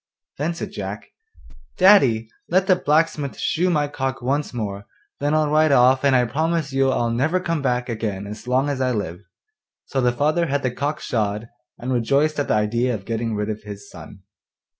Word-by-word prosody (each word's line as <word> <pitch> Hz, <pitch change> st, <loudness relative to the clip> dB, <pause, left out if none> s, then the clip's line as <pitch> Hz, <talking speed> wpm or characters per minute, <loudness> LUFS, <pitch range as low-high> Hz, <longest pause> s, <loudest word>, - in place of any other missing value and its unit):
Then 165 Hz, +4 st, -1 dB
said -, -, -6 dB
Jack, -, -, -6 dB, 0.7 s
'Daddy, 135 Hz, -, +5 dB, 0.2 s
let 185 Hz, +2 st, +3 dB
the 190 Hz, -2 st, +5 dB
blacksmith 150 Hz, -3 st, 0 dB
shoe 180 Hz, +3 st, 0 dB
my 150 Hz, -4 st, +1 dB
cock 135 Hz, -2 st, -3 dB
once 140 Hz, +4 st, -1 dB
more; 100 Hz, -4 st, -5 dB, 0.3 s
then 145 Hz, +2 st, +1 dB
I'll 155 Hz, -1 st, +2 dB
ride 155 Hz, 0 st, +4 dB
off, 130 Hz, 0 st, +5 dB
and 140 Hz, -2 st, +4 dB
I 125 Hz, -1 st, +4 dB
promise 155 Hz, +3 st, -1 dB
you 135 Hz, 0 st, +3 dB
I'll 120 Hz, -3 st, 0 dB
never 145 Hz, +10 st, +1 dB
come 165 Hz, -4 st, -2 dB
back 125 Hz, -2 st, 0 dB
again 110 Hz, -4 st, -3 dB
as 105 Hz, +3 st, -9 dB
long 130 Hz, +3 st, +2 dB
as 140 Hz, -2 st, -2 dB
I 130 Hz, -, +2 dB
live.' 100 Hz, -4 st, -4 dB, 0.6 s
So 135 Hz, -, -1 dB
the 125 Hz, -1 st, +3 dB
father 155 Hz, +7 st, +1 dB
had 140 Hz, 0 st, -1 dB
the 130 Hz, -, 0 dB
cock 145 Hz, +4 st, -3 dB
shod, 105 Hz, -1 st, -2 dB, 0.3 s
and 130 Hz, +2 st, -3 dB
rejoiced 140 Hz, +6 st, +1 dB
at 145 Hz, -, -1 dB
the -, -, +2 dB
idea 115 Hz, +4 st, +1 dB
of 100 Hz, -2 st, -8 dB
getting 115 Hz, -1 st, -2 dB
rid 105 Hz, +1 st, -2 dB
of 110 Hz, 0 st, -6 dB
his 105 Hz, -1 st, -10 dB
son. -, -, -12 dB
130 Hz, 195 wpm, -22 LUFS, 115-150 Hz, 0.7 s, Daddy